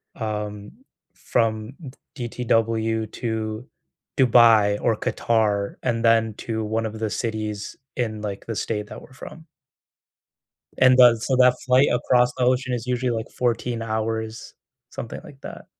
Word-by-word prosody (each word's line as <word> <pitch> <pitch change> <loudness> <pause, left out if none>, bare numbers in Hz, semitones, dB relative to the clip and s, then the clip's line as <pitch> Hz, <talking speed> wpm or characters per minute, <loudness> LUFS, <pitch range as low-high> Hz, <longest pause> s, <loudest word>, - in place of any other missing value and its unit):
um, 105 -2 -5 0.4
from 110 0 -1 0.4
D 120 -4 -4
DTW 115 -2 0
to 110 +1 -4 0.5
Dubai 115 -5 +5
or 115 - +1
Qatar, 105 -4 0
and 115 0 -1
then 115 -1 +3
to 110 -1 -3
one 110 +1 -1
of 110 0 -7
the 110 -1 -1
cities 110 -2 -4 0.2
in, 110 -4 -2
like, 100 -2 -5
the 115 - -3
state 105 0 -3
that - - -10
we're - - -16
from. 160 +4 -11 1.3
And 130 0 +6
does 120 -3 +6
so 130 - +1
that 125 0 +4
flight 130 +2 +4
across 125 0 +2
the 125 - +1
ocean 125 0 +1
is 120 -1 -5
usually, 125 0 0
like, 115 -1 -4
14 120 -1 -1
hours, 110 0 -3 0.4
something - - -7
like - - -14
that. - - -9
115 Hz, 145 wpm, -23 LUFS, 110-125 Hz, 1.3 s, And